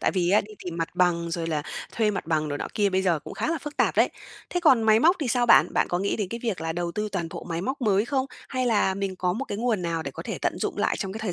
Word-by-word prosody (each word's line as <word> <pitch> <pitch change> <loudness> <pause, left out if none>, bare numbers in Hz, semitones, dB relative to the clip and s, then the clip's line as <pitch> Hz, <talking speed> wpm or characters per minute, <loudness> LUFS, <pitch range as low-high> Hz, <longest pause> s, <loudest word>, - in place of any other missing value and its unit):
Tại - - +2
vì 180 -2 +1
á 205 - +5
đi 215 +1 -11
tìm 170 -1 -5
mặt 165 -1 -1
bằng, 170 -2 +2
rồi 165 0 -2
là 155 -3 -1 0.3
thuê 220 -2 +2
mặt 195 - -4
bằng 155 -2 0
rồi 145 0 -3
nọ - - -3
kia 205 -2 +2
bây 190 0 +1
giờ 170 -4 +2
cũng - - -10
khá - - -2
là 330 - 0
phức 295 +1 -8
tạp - - +2
đấy. - - +5 0.4
Thế 355 - 0
còn 265 -9 +5
máy 220 0 +5
móc 345 +7 +5
thì 270 - -1
sao 240 0 +2
bạn? - - +6
Bạn - - +2
có 175 - 0
nghĩ 200 +1 0
đến 205 -4 -2
cái 230 +2 -5
việc 220 -8 -2
là 160 0 -2
đầu 170 0 -3
tư 210 0 -2
toàn 170 -4 -2
bộ - - -8
máy 165 0 -2
móc 265 +8 -3
mới 205 -2 +2
không? 265 +1 0 0.2
Hay 255 -1 -1
là 205 -4 +2
mình 195 -1 -3
có 180 -1 0
một 255 +8 -3
cái 205 - -5
nguồn 225 -6 0
nào 165 -1 -1
để - - -5
có - - -8
thể - - -5
tận - - -1
dụng - - -2
lại - - +1
trong 195 -2 -3
cái 220 - -6
thời 200 -5 -1
195 Hz, 330 wpm, -26 LUFS, 175-230 Hz, 0.4 s, bạn